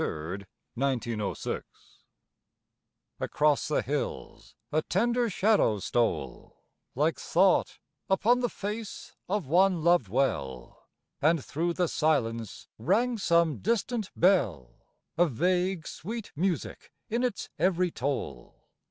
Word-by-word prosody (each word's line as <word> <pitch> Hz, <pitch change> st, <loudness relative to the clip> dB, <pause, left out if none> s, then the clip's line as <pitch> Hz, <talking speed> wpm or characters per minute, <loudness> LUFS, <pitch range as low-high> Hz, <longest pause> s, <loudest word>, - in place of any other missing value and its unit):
MALVERN 90 Hz, +6 st, -4 dB, 0.3 s
July 135 Hz, 0 st, +2 dB
23rd, -, -, -2 dB
1906 110 Hz, -5 st, -3 dB, 1.5 s
Across 150 Hz, -1 st, +1 dB
the 150 Hz, -, +1 dB
hills 145 Hz, +2 st, -4 dB, 0.2 s
a 155 Hz, -, +2 dB
tender 235 Hz, +7 st, +1 dB
shadow 200 Hz, -, +3 dB
stole, 115 Hz, +4 st, -2 dB, 0.3 s
Like 150 Hz, +5 st, +1 dB
thought 185 Hz, +2 st, +2 dB, 0.3 s
upon 225 Hz, +6 st, +3 dB
the 245 Hz, -1 st, 0 dB
face 210 Hz, +1 st, -6 dB
of 200 Hz, -3 st, 0 dB
one 175 Hz, +3 st, +3 dB
loved 170 Hz, -, +4 dB
well, 70 Hz, -, -2 dB, 0.3 s
And 155 Hz, -1 st, +2 dB
thro' 165 Hz, +5 st, -1 dB
the 180 Hz, 0 st, +1 dB
silence 115 Hz, -, -1 dB
rang 235 Hz, -, +1 dB
some 170 Hz, -4 st, +2 dB
distant 230 Hz, +1 st, -1 dB
bell, 105 Hz, -, +2 dB, 0.5 s
A 175 Hz, -, +6 dB
vague 180 Hz, +4 st, 0 dB
sweet 225 Hz, +5 st, -6 dB
music 170 Hz, -1 st, -2 dB, 0.2 s
in 235 Hz, +2 st, -1 dB
its 245 Hz, -6 st, -2 dB
every 180 Hz, -1 st, +2 dB
toll. 125 Hz, -, -4 dB
170 Hz, 115 wpm, -28 LUFS, 125-195 Hz, 1.5 s, A